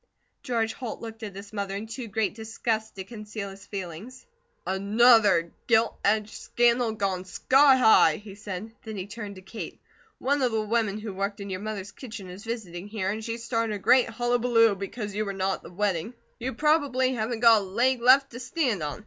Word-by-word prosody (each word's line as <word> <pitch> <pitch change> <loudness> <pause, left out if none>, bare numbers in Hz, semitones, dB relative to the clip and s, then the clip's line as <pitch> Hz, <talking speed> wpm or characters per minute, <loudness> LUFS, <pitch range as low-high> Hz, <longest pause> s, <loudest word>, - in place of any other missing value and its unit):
George 225 -3 -1
Holt 245 -4 -6
looked 225 0 -9
at 205 -3 -7
his 200 +1 -10
mother 200 -2 -3
in 205 +2 -4
too 230 +2 -6
great 215 -1 -1
disgust 220 0 -3
to 190 - -5
conceal 210 -1 -7
his 195 +1 -13
feelings. 195 +6 -7 0.4
"ANOTHER 205 -3 +4 0.2
gilt 225 -1 +3
edged 215 +1 +1
scandal 240 -1 +2
gone 195 -4 -1
sky 270 +8 +4
high," 220 -10 +6
he 205 +1 -10
said. 205 +1 -7
Then 220 -2 -7
he 185 - -4
turned 205 -1 -7
to 185 - -12
Kate. 190 +4 -8 0.4
"One 280 +2 0
of 250 -3 +1
the 220 - +1
women 215 -2 0
who 215 -2 -6
worked 200 +2 -3
in 200 -1 -6
your 185 - -3
mother's 205 -2 -5
kitchen 215 -7 -9
is 190 +3 -10
visiting 200 -6 -5
here, 205 -3 -2
and 220 +1 -5
she 230 +1 -3
started 230 -2 -1
a - - -3
great 235 +6 +4
hullabaloo 240 -1 +3
because 200 +2 -5
you 210 +2 -1
were 200 -2 -4
not 195 0 -1
at - - -23
the - - -12
wedding. 200 +3 -1 0.2
You 245 0 -4
probably 280 -3 +2
haven't 225 -1 -2
got 230 -3 +7
a - - -5
leg 240 +6 +1
left 270 +3 +6
to 240 - -8
stand 250 - -1
on. 150 +4 -4
220 Hz, 200 wpm, -26 LUFS, 200-235 Hz, 0.4 s, got